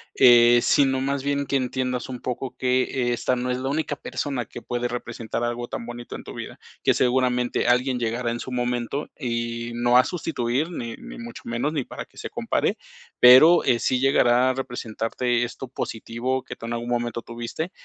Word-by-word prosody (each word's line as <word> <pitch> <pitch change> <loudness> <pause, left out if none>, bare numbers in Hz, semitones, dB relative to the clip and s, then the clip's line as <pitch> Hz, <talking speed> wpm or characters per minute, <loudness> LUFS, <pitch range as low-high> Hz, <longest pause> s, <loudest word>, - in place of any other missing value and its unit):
eh, 120 -1 +7
sino 135 -2 +3
más 140 0 -1
bien 140 0 0
que 140 - -2
entiendas 125 -1 -1
un 125 -1 -5
poco 125 +1 -4
que 125 -1 +1
esta 125 +1 0
no 125 +1 -2
es 125 0 -1
la 135 +1 -2
única 150 0 -1
persona 135 -4 -3
que 120 - -10
puede 120 0 -2
representar 120 -2 -4
algo 120 0 -3
tan 115 - -5
bonito 120 0 -7
en - - -12
tu - - -8
vida, - - -8 0.2
que - - +4
seguramente 125 -1 +1
alguien 125 +1 +2
llegará 120 +1 -1
en 120 - -4
su 130 - -7
momento 125 +3 -2
y 115 -2 -3
no 120 +1 +3
a 125 - +7
sustituir, 150 -3 -2
ni 115 -9 -5
ni 245 +1 -10
mucho 235 0 -9
menos, 120 +6 -1
ni 145 -6 -2
para - - -7
que - - -24
se - - -6
compare. - - -1 0.4
Pero 130 +8 +9
eh, 120 -3 +2
sí 130 -1 +1
llegará 130 -2 +4
a - - +1
representarte 120 -1 -2
esto 125 +1 -8
positivo 125 +2 -3
que - - -9
tú - - -8
en 115 - -3
algún 120 +1 -4
momento 120 -1 -1
tuviste. 120 - -5
125 Hz, 195 wpm, -24 LUFS, 120-130 Hz, 0.4 s, Pero